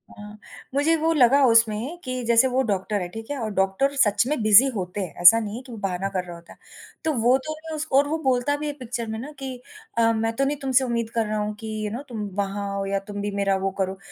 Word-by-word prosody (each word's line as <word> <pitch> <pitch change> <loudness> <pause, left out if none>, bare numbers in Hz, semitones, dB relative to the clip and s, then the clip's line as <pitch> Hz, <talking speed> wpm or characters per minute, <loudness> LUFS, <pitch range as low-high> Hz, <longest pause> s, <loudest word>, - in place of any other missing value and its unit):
हाँ, 210 0 -11 0.4
मुझे 290 +4 +2
वो 325 +1 +1
लगा 275 -1 +5
उसमें 230 +6 +2
कि 255 -1 -4
जैसे 235 +2 +4
वो 260 +1 +1
डॉक्टर 205 -1 -1
है, 180 - -3
ठीक 225 +6 -9
है? 285 - -3
और 225 -3 -3
डॉक्टर 195 +9 +1
सच 215 -5 +3
में 295 -4 -1
बिज़ी 215 +5 +7
होते 185 0 -4
हैं, 180 -5 -5
ऐसा 200 +6 +9
नहीं 215 -1 -5
है 250 - -6
कि 255 - -13
वो 230 - -8
बहाना 195 -1 -2
कर 185 -2 -2
रहा 175 -1 -9
होता 170 0 -14
है। - - -25 0.5
तो 315 - +1
वो 245 +1 +3
तो 310 - -3 0.2
उसको 300 -3 0
और 285 - +4
वो 315 +2 -1
बोलता 260 +2 +1
भी 300 +1 -4
है 290 - -3
पिक्चर 235 -1 -5
में 220 0 -4
ना 280 +6 -7
कि 265 -2 -5 0.4
अ, 230 0 +4
मैं 225 0 -1
तो 275 - +1
नहीं 290 +2 -1
तुमसे 265 -1 +2
उम्मीद 235 -2 -2
कर 225 -1 +1
रहा 215 0 -2
हूँ 210 0 -2
कि 215 -1 -5
यू 210 - -3
नो 240 - -5
तुम 225 -3 -5
वहाँ 200 0 -2
आओ 195 0 -2
या 195 0 -1
तुम 205 -1 -5
भी 205 0 -3
मेरा 195 -1 +1
वो 195 - 0
करो। 190 0 -1
225 Hz, 270 wpm, -24 LUFS, 205-265 Hz, 0.5 s, ऐसा